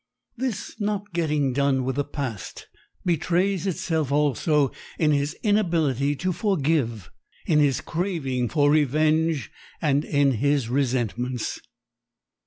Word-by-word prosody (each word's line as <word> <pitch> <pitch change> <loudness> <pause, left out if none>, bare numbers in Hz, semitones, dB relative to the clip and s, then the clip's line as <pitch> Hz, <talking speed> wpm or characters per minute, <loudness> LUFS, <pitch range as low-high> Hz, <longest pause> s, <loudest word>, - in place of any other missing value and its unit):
This 245 -5 -4
not 205 -2 -2
getting 150 -5 +1
done 140 -1 +2
with 130 +1 -2
the 145 - +1
past 130 -9 -6 0.4
betrays 180 +3 +1
itself 160 -6 -1
also 145 0 +2 0.3
in 155 -2 +3
his 145 0 0
inability 165 - +1
to 185 +6 -1
forgive, 150 - 0 0.3
in 150 - +3
his 140 -3 +2
craving 155 - -2
for 145 -2 +3
revenge 155 +1 +2 0.3
and 145 -2 +2
in 145 -3 +2
his 140 -1 +1
resentments. 125 -2 -1
150 Hz, 115 wpm, -24 LUFS, 135-170 Hz, 0.4 s, in